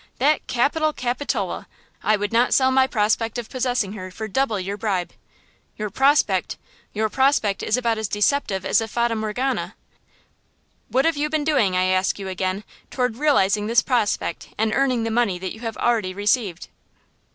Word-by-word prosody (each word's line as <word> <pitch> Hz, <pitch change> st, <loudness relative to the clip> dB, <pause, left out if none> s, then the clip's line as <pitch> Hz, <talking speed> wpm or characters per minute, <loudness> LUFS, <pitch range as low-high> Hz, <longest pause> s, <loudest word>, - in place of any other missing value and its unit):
that 295 Hz, +4 st, +2 dB
capital 305 Hz, +6 st, +1 dB
Capitola! 250 Hz, +2 st, -2 dB, 0.3 s
I 215 Hz, -, +3 dB
would 205 Hz, +1 st, -3 dB
not 240 Hz, +2 st, +3 dB
sell 260 Hz, -1 st, +4 dB
my 260 Hz, 0 st, +4 dB
prospect 225 Hz, -1 st, 0 dB
of 240 Hz, -2 st, -6 dB
possessing 245 Hz, -6 st, -1 dB
her 185 Hz, -3 st, -7 dB
for 220 Hz, +4 st, -6 dB
double 220 Hz, 0 st, 0 dB
your 195 Hz, +2 st, -3 dB
bribe." 195 Hz, -4 st, -2 dB, 0.6 s
"Your 210 Hz, -2 st, -4 dB
'prospect!' 265 Hz, -7 st, +2 dB, 0.3 s
Your 220 Hz, +1 st, 0 dB
prospect 245 Hz, -4 st, +1 dB
is 220 Hz, -, +1 dB
about 230 Hz, -3 st, 0 dB
as 220 Hz, -, -2 dB
deceptive 205 Hz, -2 st, 0 dB
as 210 Hz, -, +3 dB
a 225 Hz, -, -3 dB
fata 235 Hz, +1 st, 0 dB
morgana! 220 Hz, +5 st, -2 dB, 1.1 s
What 265 Hz, +1 st, +2 dB
have 330 Hz, -2 st, +2 dB
you 300 Hz, +1 st, 0 dB
been 310 Hz, -1 st, 0 dB
doing, 265 Hz, -12 st, +2 dB
I 185 Hz, -, +2 dB
ask 185 Hz, 0 st, +1 dB
you 195 Hz, -1 st, -6 dB
again, 185 Hz, +2 st, -2 dB, 0.3 s
toward 250 Hz, -3 st, -1 dB
realizing 210 Hz, -8 st, +2 dB
this 230 Hz, +1 st, +3 dB
prospect 240 Hz, -5 st, -1 dB
and 220 Hz, 0 st, +1 dB
earning 255 Hz, -4 st, +1 dB
the 225 Hz, -, -2 dB
money 225 Hz, -5 st, +1 dB
you 190 Hz, +4 st, -6 dB
have 225 Hz, -2 st, -5 dB
already 215 Hz, -6 st, 0 dB
received?" 205 Hz, -3 st, 0 dB
225 Hz, 170 wpm, -22 LUFS, 200-260 Hz, 1.1 s, sell